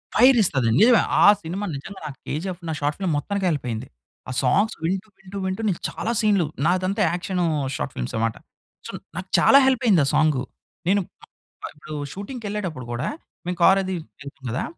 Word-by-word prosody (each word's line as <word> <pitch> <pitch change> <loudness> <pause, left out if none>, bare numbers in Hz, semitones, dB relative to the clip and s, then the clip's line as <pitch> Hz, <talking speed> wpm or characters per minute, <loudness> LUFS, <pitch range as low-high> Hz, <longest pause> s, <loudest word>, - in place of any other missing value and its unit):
Fire 250 +1 +7
ఇస్తాది. 135 - +1
నిజమే. 235 0 +6 0.2
ఆ - - +8
సినిమా 180 +5 -4
నిజంగా 190 +8 -8
నాకు 140 -3 -7
'కేజీఎఫ్' 180 +4 -4
నా - - -1
షార్ట్ 145 +1 0
ఫిల్మ్ 185 -4 0
మొత్తానికి 200 +6 -2
హెల్ప్ 145 -6 -2
అయింది. 110 -1 -4 0.4
ఆ - - -3
సాంగ్స్ 200 - +2
వింటూ, 190 +5 -1
వింటూ, 190 +1 -9
వింటూ 190 +3 -2
నేను 185 -5 -1
చాలా 230 - -3
సీన్‌లు 205 -5 +3 0.2
నాదంతా 185 +3 +1
యాక్షనూ 180 0 -1 0.3
షార్ట్ 65 - -4
ఫిల్మ్స్ - - -4
అనమాట. 115 0 0 0.5
సో - - -6 0.2
నాకు 185 +1 -6
చాలా 275 - +7
హెల్ప్ 260 -1 +2
అయింది 195 -8 +5
ఆ - - -1
సాంగ్. 155 -4 +3 0.5
నేను 200 +2 +3 0.2
ఆ! - - -11 0.4
ఆహ్, - - -6
ఇప్పుడు 150 +1 -8 0.2
షూటింగ్‌కి 220 +4 -7
ఎళ్ళేటప్పుడు 180 - -4
కూడా 120 +7 -2 0.4
మేము 180 0 -3
కార్ 190 +2 +6
అది 185 0 -3 0.3
ఎళ్తాం 140 -1 -11
కదా! 125 - -2
185 Hz, 185 wpm, -23 LUFS, 150-200 Hz, 0.5 s, ఆ